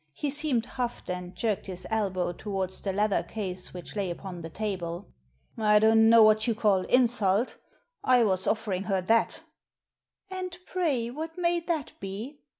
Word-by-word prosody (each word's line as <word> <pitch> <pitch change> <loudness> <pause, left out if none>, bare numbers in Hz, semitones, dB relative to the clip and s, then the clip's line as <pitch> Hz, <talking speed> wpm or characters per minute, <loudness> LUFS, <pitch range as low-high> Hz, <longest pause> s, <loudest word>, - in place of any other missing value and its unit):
He 290 - -2
seemed 285 -5 0
huffed, 245 -6 -4
and 180 0 -6
jerked 210 +1 -1
his 185 -1 -7
elbow 190 -5 0
towards 190 0 -3
the 195 - -1
leather 205 -2 +1
case 185 0 -5
which 180 +2 -9
lay 200 -3 -1
upon 175 0 -6
the 165 - -7
table. 185 -2 -4 0.3
" 65 - -40 0.2
I 210 -1 +5
don't 220 +1 +5
know 230 -1 +8
what 215 +1 +4
you 230 - +1
call 205 -4 +3
insult 235 -3 +2 0.5
I 250 -2 +5
was 190 -3 +2
offering 205 -4 -1
her 195 -2 0
that" 225 +5 +1 0.9
"And 365 -2 -5
pray 280 -11 -1
what 320 +5 -6
may 345 -1 +1
that 330 -4 -3
be? 215 +9 -6
215 Hz, 165 wpm, -28 LUFS, 190-245 Hz, 0.9 s, know